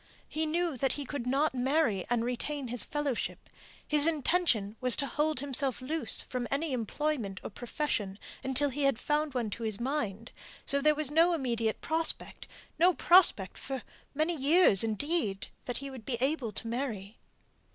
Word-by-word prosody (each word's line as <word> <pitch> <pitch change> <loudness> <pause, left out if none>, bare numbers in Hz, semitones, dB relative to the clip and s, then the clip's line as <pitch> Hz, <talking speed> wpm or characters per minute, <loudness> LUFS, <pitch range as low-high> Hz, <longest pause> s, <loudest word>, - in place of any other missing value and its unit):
He 315 +1 -2
knew 335 -2 -1
that 265 +2 +1
he 285 - -5
could 260 -3 -5
not 275 +4 +2
marry 255 - +1
and 240 -1 +1
retain 255 +2 -3
his 245 -1 +1
fellowship; 290 -4 -3 0.4
his 300 0 +6
intention 295 - +1
was 250 -2 +2
to 280 - -1
hold 300 0 0
himself 275 -2 0
loose 270 -1 0
from 250 -1 -4
any 285 +1 -1
employment 235 -4 -2
or - - -6
profession 225 -4 -3 0.3
until 265 +2 +1
he 280 +2 -4
had 275 -4 +3
found 295 +1 -1
one 235 -4 -1
to 230 - -6
his 220 -3 -2
mind, 235 -4 -3 0.3
so 280 0 +3
there 305 +1 +4
was 300 -2 +1
no 335 +3 +4
immediate 235 -6 -1
prospect 325 +1 0 0.3
no 355 +1 +5
prospect 345 - +4
for 270 -2 -5 0.3
many 315 +4 +1
years, 290 - +4
indeed, 225 - -1 0.2
that 245 - -2
he 275 0 -6
would 255 -4 -9
be 240 0 -3
able 265 -3 0
to 220 - -6
marry. 225 -4 -4
270 Hz, 170 wpm, -30 LUFS, 235-300 Hz, 0.4 s, his